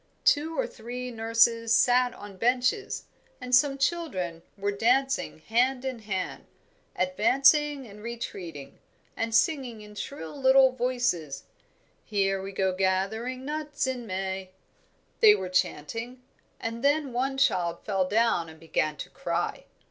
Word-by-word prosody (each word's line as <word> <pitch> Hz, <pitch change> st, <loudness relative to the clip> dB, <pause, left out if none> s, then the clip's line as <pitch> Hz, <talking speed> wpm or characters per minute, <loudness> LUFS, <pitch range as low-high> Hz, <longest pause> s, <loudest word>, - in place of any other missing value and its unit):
Two 315 Hz, +3 st, +3 dB
or -, -, +1 dB
three 250 Hz, -, -7 dB
nurses 230 Hz, 0 st, +2 dB
sat 245 Hz, +2 st, +4 dB
on 205 Hz, -1 st, -10 dB
benches, 250 Hz, -, 0 dB, 0.4 s
and 250 Hz, 0 st, -6 dB
some 275 Hz, +1 st, +3 dB
children 265 Hz, -, -1 dB, 0.2 s
were 200 Hz, +1 st, -1 dB
dancing 260 Hz, +6 st, +1 dB
hand 250 Hz, +9 st, +1 dB
in 260 Hz, -3 st, -3 dB
hand, 195 Hz, -4 st, -4 dB, 0.5 s
advancing 275 Hz, 0 st, +3 dB
and 210 Hz, -2 st, -12 dB
retreating, 180 Hz, -11 st, -7 dB, 0.4 s
and 225 Hz, 0 st, -1 dB
singing 250 Hz, -5 st, +1 dB
in 210 Hz, 0 st, -12 dB
shrill 205 Hz, -, -7 dB
little 265 Hz, -1 st, +5 dB
voices. 245 Hz, -, -1 dB, 0.6 s
"Here 195 Hz, -2 st, 0 dB
we 195 Hz, +1 st, -6 dB
go 190 Hz, -1 st, 0 dB
gathering 200 Hz, +7 st, -1 dB
nuts 300 Hz, -1 st, -2 dB
in 250 Hz, -3 st, -3 dB
May," 190 Hz, 0 st, -3 dB, 0.7 s
they 425 Hz, -2 st, +8 dB
were 185 Hz, -, -4 dB
chanting, 225 Hz, +8 st, -2 dB, 0.4 s
and 230 Hz, +2 st, -5 dB
then 285 Hz, -2 st, +2 dB
one 265 Hz, +2 st, -1 dB
child 175 Hz, -10 st, +1 dB
fell 195 Hz, -3 st, 0 dB
down 210 Hz, -6 st, +2 dB
and 160 Hz, 0 st, -14 dB
began 155 Hz, -2 st, -1 dB
to -, -, -7 dB
cry. -, -, -3 dB
230 Hz, 135 wpm, -27 LUFS, 195-265 Hz, 0.7 s, they